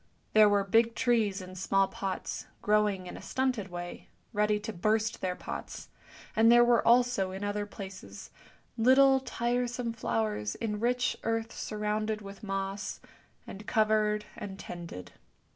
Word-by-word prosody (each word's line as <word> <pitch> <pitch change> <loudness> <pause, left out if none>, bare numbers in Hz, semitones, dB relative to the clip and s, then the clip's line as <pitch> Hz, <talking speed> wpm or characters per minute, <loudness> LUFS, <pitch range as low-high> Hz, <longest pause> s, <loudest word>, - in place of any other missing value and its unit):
There 215 -1 +7
were 205 -1 +3
big 225 +3 +3
trees 225 -6 +1
in 185 0 -10
small 195 +1 +2
pots, 190 -1 -4 0.2
growing 210 -3 +2
in - - -7
a - - -9
stunted 255 -6 -1
way, 175 -1 -7 0.3
ready 210 0 +2
to 215 +1 -5
burst 215 +4 0
their 180 -1 -1
pots; - - -7 0.5
and 225 +1 +6
there 240 0 +7
were 240 -1 +4
also, 240 -5 +4
in 190 +2 -6
other 205 0 -2
places, 190 - -9 0.5
little 265 +3 +6
tiresome 240 -1 -2
flowers 105 - -1
in 210 -2 -3
rich 245 +2 +1
earth 225 0 -2
sur 215 - -5
rounded 215 +1 -1
with 200 -1 -10
moss, 195 -1 -3 0.5
and 205 +2 -10
covered 215 -1 +2
and 195 -2 -7
tended. 170 - -8
210 Hz, 145 wpm, -30 LUFS, 195-230 Hz, 0.5 s, There